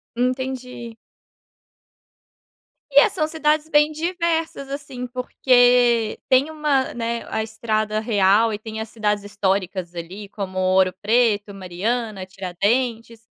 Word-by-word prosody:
Entendi. 250 -2 -3 1.9
E 280 0 +6
é - - +4
são 310 - -1
cidades 310 -1 0
bem 295 0 +4
diversas 330 -3 -2
assim 275 -3 -6
porque, 245 -2 +3
tem 265 +4 +4
uma, 295 -4 0
né, 235 0 -3
a 220 - -1
estrada 215 -1 -2
real 215 0 +3
e 205 - -4
tem 220 0 -7
as 220 - -6
cidades 210 -2 -1
históricas 190 -3 -2
ali 185 +5 -7
como 190 -3 -6
Ouro 185 0 +3
Preto, 215 -2 +2
Mariana, 195 +3 -3
Tiradentes, 220 +5 -2
230 Hz, 115 wpm, -22 LUFS, 205-260 Hz, 1.9 s, E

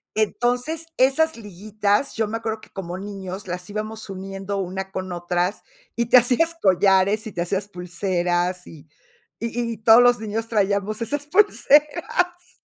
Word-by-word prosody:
Entonces, 245 +9 -1
esas 275 +3 +3
liguitas, 210 +4 -1
yo 220 -2 0
me 225 +2 -3
acuerdo 220 -1 -4
que - - -16
como 180 -2 -6
niños 195 0 -7
las 180 +1 -6
íbamos 215 +1 -5
uniendo 195 +1 -5
una 190 0 -4
con 185 -1 -5
otras, 175 +2 -1 0.3
y 235 -1 -1
te 250 - +7
hacías 260 +8 +3
collares, 195 +3 +3
y 220 - -6
te 175 - -4
hacías 195 +3 -2
pulseras. 180 -1 -2
Y 155 -1 -13 0.5
y 235 0 -2
y - - -9
todos 225 +2 +7
los 245 -1 +4
niños 220 +1 -4
traíamos 205 0 0
esas 290 +6 -1
pulseras. 355 0 +2
210 Hz, 150 wpm, -22 LUFS, 190-235 Hz, 0.5 s, te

